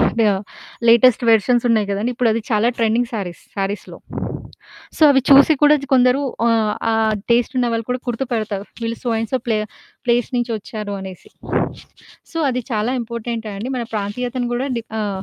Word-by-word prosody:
కాడ 230 - +2 0.7
latest 235 +2 +6
versions 240 +3 +3
ఉన్నాయి 215 -3 +2
కదండీ, 205 +5 -1
ఇప్పుడది 230 -2 +1
చాలా 220 +1 +3
ట్రెండింగ్ 230 +1 +1
శారీస్‌, 190 -6 -5
శారీస్‌లో. 200 +1 -4 1.0
సో - - -1
అవి 270 -1 +5
చూసి 280 +3 +8
కూడా 295 0 +7 0.2
కొందరు 255 +1 +4 0.3
ఆహ్, 225 -2 +2 0.2
ఆ - - +1 0.4
టేస్ట్ 240 +2 +2
ఉన్నవాళ్ళు 230 -2 0
కూడా 250 - -1
గుర్తుపడతారు. 225 -5 -2 0.2
వీళ్ళు 230 0 -3
సో 245 - -1
అండ్ 225 -1 -3
సో 260 - +2
ప్లే-ప్లేస్ 235 +2 -2
నుంచి 240 0 -1
వచ్చారు 210 0 -6
అనేసి. 190 -2 -10 1.0
సో 330 - -4
అది 250 -1 -1
చాలా 215 +3 0
ఇంపార్టెంట్ 235 -1 -5
అండి. 215 +6 -5
మన 240 - -2
ప్రాంతీయతను 245 +4 -2
కూడా 250 +3 -1
డి 230 - -2 0.2
ఆహ్, 200 -2 -3
230 Hz, 155 wpm, -20 LUFS, 215-245 Hz, 1.0 s, చూసి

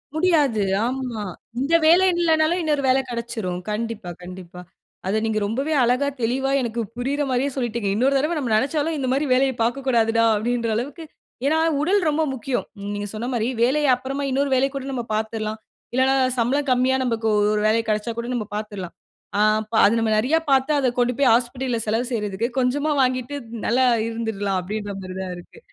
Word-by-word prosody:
முடியாது 300 - +2 0.2
ஆமா, 250 -4 -3 0.4
இந்த 280 +5 -1
வேலை 350 +4 +6
இல்லனாலும் 325 +1 +2
இன்னொரு 295 -3 0
வேல 260 +1 +4
கெடச்சிரும் 230 -7 -4
கண்டிப்பா 220 -3 -4
கண்டிப்பா. 180 0 -10 0.5
அத 210 +3 +1
நீங்க 215 -1 0
ரொம்பவே 270 +9 -1
அழகா 250 +4 +2
தெளிவா 265 +4 0
எனக்கு 235 -1 -2 0.2
புரியிற 275 +4 -1
மாரியே 260 +2 +1
சொல்லிட்டீங்க. 235 -5 -2
இன்னொரு 270 +5 +2
தடவ 305 +5 0
நம்ம 245 -5 -2
நெனச்சாலும் 295 +6 0
இந்த 260 -2 -2
மாரி 280 +3 +1
வேலைய 265 +1 +3
பாக்கக்கூடாதுடா 230 -2 +1
அப்படீன்ற 235 +2 -1
அளவுக்கு 285 +8 -4 0.4
ஏன்னா 315 +3 +3 0.2
உடல் 390 +6 +3
ரொம்ப 305 +2 0
முக்கியம். 255 0 -2 0.3
நீங்க 205 0 -4
சொன்ன 230 +3 -4
மாரி 230 -1 0 0.2
வேலைய 290 +4 +2
அப்புறமா 270 +3 -4
இன்னொரு 275 +1 +1
வேலைக் 270 +2 +1
கூட 270 -1 -4
நம்ம 240 - -2
பாத்திரலாம். 220 0 -3 0.3
இல்லன்னா 260 +1 +3 0.2
சம்பளம் 270 +4 +1
கம்மியா 255 +1 +3
நமக்கு 230 -3 -1 0.3
ஒரு 210 - 0
வேலை 225 +1 +3
கெடச்சா 215 +2 0
கூட 235 - -4
நம்ம 220 -3 -2
பாத்ரலாம். 205 -5 -5 0.4
அ - - +1 0.2
அப்ப 220 +1 +1 0.2
நம்ம 225 -1 +1
நிறைய 255 +9 +2
பாத்து 270 +2 +3
அத 260 -2 +2
கொண்டு 245 +1 +2
போய் 265 -4 +5
ஹாஸ்பிடல்ல 245 0 0
செலவு 225 +3 0
செய்றதுக்கு, 210 0 -1
கொஞ்சமா 285 +5 +1
வாங்கிட்டு 255 +2 0 0.3
நல்லா 255 +3 +3 0.2
இருந்துரலாம் 205 -4 -2
அப்டின்ற 205 +2 -5
மாரிதான் 185 0 -5
இருக்கு 175 - -14
245 Hz, 165 wpm, -22 LUFS, 220-275 Hz, 0.5 s, வேலை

